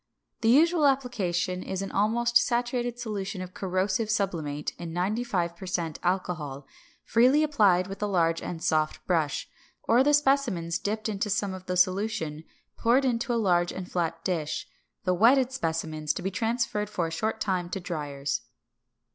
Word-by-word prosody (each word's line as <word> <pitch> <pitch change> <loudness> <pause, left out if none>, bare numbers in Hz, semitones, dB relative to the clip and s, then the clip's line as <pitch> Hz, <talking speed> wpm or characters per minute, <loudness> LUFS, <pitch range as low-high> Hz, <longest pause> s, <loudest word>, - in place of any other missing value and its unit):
The 225 - +3
usual 310 +4 +5
application 190 -10 0
is 190 +1 -3
an 195 - -5
almost 235 +4 +1
saturated 240 0 +2
solution 210 -4 -4
of 185 0 -7
corrosive 190 +3 -1
sublimate 165 -9 -1
in 170 -1 -6
95 185 -2 -1
per 185 +2 -9
cent 170 -4 -2
alcohol, 170 -7 -2 0.4
freely 255 +6 +4
applied 205 -12 +3
with 195 +2 -8
a 210 - +1
large 165 -4 +1
and 165 -2 -6
soft 155 -1 0
brush, 160 -6 0 0.4
or 240 +3 +4
the 295 +1 +5
specimens 255 - +1
dipped 215 +2 -2
into 210 0 -2
some 200 -1 0
of 185 0 -9
the 180 0 -1
solution 185 -4 0 0.3
poured 245 +4 +3
into 245 0 0
a - - +1
large 175 -6 +2
and 185 -1 -7
flat 165 -1 -2
dish; 165 -5 -2 0.4
the 185 -2 +2
wetted 250 +7 +4
specimens 160 - -2
to 185 - -6
be 190 - -1
transferred 225 0 -1
for 175 -5 -1
a 165 - -4
short 220 +6 -2
time 185 -4 -1
to 195 - -3
driers. 145 -6 -3
190 Hz, 165 wpm, -27 LUFS, 170-230 Hz, 0.4 s, usual